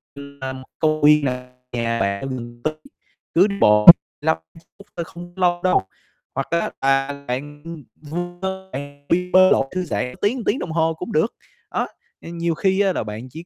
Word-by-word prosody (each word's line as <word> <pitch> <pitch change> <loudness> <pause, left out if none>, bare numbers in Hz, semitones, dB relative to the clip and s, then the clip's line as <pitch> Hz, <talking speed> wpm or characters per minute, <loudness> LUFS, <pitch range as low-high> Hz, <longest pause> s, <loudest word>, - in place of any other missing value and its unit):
như 140 0 -11
là 130 0 -3 0.3
công 155 -1 +1
viên 150 0 +6
nè, 125 -1 -3 0.2
nhà 115 -1 -1
bạn 100 -1 0
ở 135 - -4
gần 120 -2 -7
tới 155 - 0 0.6
cứ 185 +4 +6
đi 200 - -3
bộ 105 0 +5 0.3
lăm - - +2 0.2
phút, 165 - -17
ưm, 200 - -15
thôi 170 - -1
không 175 +1 -11
lâu 175 -2 +1
đâu. 185 - +3 0.5
Hoặc 135 - -2
á, 170 - +2 0.2
là 135 +1 +1
bạn, 145 +4 -5
ừm, 165 -3 -8 0.2
vu 175 +3 -5
vơ 190 0 -5
nè, 145 +1 -8
đi 180 +1 +1
bơi 185 0 +7
lội 135 - +4
thư 185 - 0
giãn 125 -1 -2
tiếng 235 +4 0
tiếng - - +1
đồng 170 - -5
hồ 160 0 +1
cũng 170 +3 -7
được, 160 +9 +1 0.4
đó, - - 0 0.3
ừm, 170 +1 -8
nhiều 170 -1 0
khi 190 +3 +1
á, 195 -2 +2
là - - -2
bạn 110 +4 -7
chỉ 160 +6 -10
155 Hz, 210 wpm, -21 LUFS, 130-175 Hz, 0.6 s, bơi